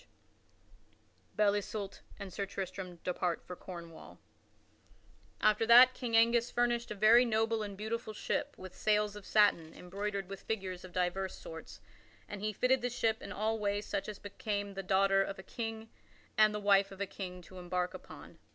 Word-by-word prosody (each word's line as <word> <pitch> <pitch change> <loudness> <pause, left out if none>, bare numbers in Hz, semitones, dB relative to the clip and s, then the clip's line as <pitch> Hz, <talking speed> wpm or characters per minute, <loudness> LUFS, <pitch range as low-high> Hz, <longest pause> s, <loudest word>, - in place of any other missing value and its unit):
[Sidenote: - - -33
Belle 210 -1 +4
Isoult 205 -1 -4 0.2
and 195 -3 -8
Sir 200 -1 -3
Tristram 190 -2 -5
depart 180 -1 -1
for 180 - -7
Cornwall] 170 -3 -10 1.2
After 215 +1 +3
that, 245 +2 +9
King 235 -3 0
Angus 235 +1 +4
furnished 240 0 0
a 210 - -4
very 220 +4 +6
noble 225 -1 +1
and 200 -2 -5
beautiful 220 +2 -3
ship 215 - -3
with 185 -1 -10
sails 210 -1 +1
of 205 -2 -10
satin 200 -7 +3
embroidered 200 +1 -4
with 195 0 -8
figures 190 -4 -4
of 185 - -10
divers 185 +1 -1
sorts, 160 0 -10 0.5
and 205 -1 -7
he 215 +1 -1
fitted 250 +5 +2
the 245 - -1
ship 225 -2 0
in - - -8
all 220 +1 -1
ways 205 0 -1
such 200 0 -3
as 210 - -6
became 205 0 -4
the 195 - -4
daughter 195 +1 +3
of 195 0 -3
a 190 - -9
king 225 +2 -5 0.5
and 215 0 +6
the 210 - -3
wife 200 -1 +4
of 195 - -11
a 200 - 0
king 180 -2 -7
to 185 +2 -12
embark 180 0 -2
upon. - - -12
205 Hz, 180 wpm, -33 LUFS, 190-220 Hz, 1.2 s, that